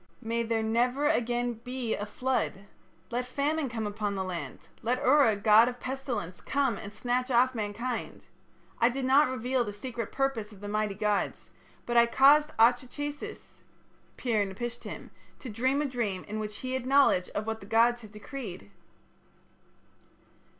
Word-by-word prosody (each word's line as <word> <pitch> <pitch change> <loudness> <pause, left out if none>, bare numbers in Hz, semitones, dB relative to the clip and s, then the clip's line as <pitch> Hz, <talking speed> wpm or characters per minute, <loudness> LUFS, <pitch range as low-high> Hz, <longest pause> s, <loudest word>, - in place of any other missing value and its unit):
May 230 +1 -1
there 225 -1 0
never 245 +5 +1
again 245 -4 +1
be 250 -2 -2
a 205 - -5
flood. 215 -4 -2 0.5
Let 245 +1 0
famine 285 +3 -1
come 225 -2 -3
upon 205 -1 -2
the 190 - -1
land; 180 -2 -5 0.2
let 245 +2 0
Ura, 265 -5 +5
god 215 +3 +6
of 245 0 -8
pestilence, 245 -10 -4
come 275 -5 0
and 200 0 -8
snatch 245 +4 -1
off 255 +1 +4
mankind.... 230 +2 -4 0.6
I 235 - +5
did 260 +1 -3
not 275 +2 +5
reveal 255 0 0
the 205 -3 -5
secret 230 +1 -5
purpose 270 -6 -1
of 205 - -14
the 205 - -7
mighty 210 -1 -1
gods, 210 -1 -1 0.3
but 240 0 0
I 235 0 +7
caused 290 +5 +6
Atra 245 +3 +4
chasis 290 +3 -7 0.6
(Pir 225 -5 +1
napishtim) 235 +5 -6 0.3
to 255 - -8
dream 260 +7 +1
a - - -1
dream 230 -8 -2
in 215 +1 -5
which 210 -1 -5
he 255 0 -3
had 260 -1 -2
knowledge 270 -9 +4
of 210 - -1
what 220 0 -3
the 195 - -12
gods 235 +2 +3
had 215 -2 -12
decreed.' 210 - -8
235 Hz, 165 wpm, -29 LUFS, 210-260 Hz, 0.6 s, I